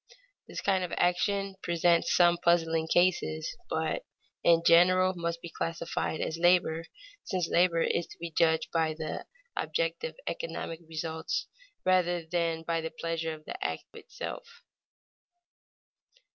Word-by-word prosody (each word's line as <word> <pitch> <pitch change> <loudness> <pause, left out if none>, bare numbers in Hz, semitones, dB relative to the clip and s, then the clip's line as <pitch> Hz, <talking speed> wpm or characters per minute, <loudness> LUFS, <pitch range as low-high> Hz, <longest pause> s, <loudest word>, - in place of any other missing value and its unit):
This - - -6
kind 190 -2 +2
of 180 - -4
action 195 +2 +1
presents 170 0 +2
some 175 -1 +5
puzzling 165 -2 +3
cases, 165 - +1
but - - -1 0.4
in 165 -1 +5
general 185 +2 +6
must 170 -1 -3
be 170 - -6
classed 165 0 -3
as 160 +1 -1
labor, 175 -2 +3 0.4
since 180 -3 -1
labor 170 -1 +3
is 170 - 0
to - - -13
be 170 0 -6
judged 160 0 +2
by 160 -2 +1
the 155 -1 -5 0.3
objective - - -2
economic 165 - -4
results 160 0 -3 0.4
rather 175 -2 +2
than 165 -1 -1
by 165 0 -1
the 160 - -3
pleasure 165 0 -3
of 155 0 -16
the 375 +2 -5
act - - -2
itself. 470 -1 -8
170 Hz, 130 wpm, -29 LUFS, 165-180 Hz, 0.4 s, general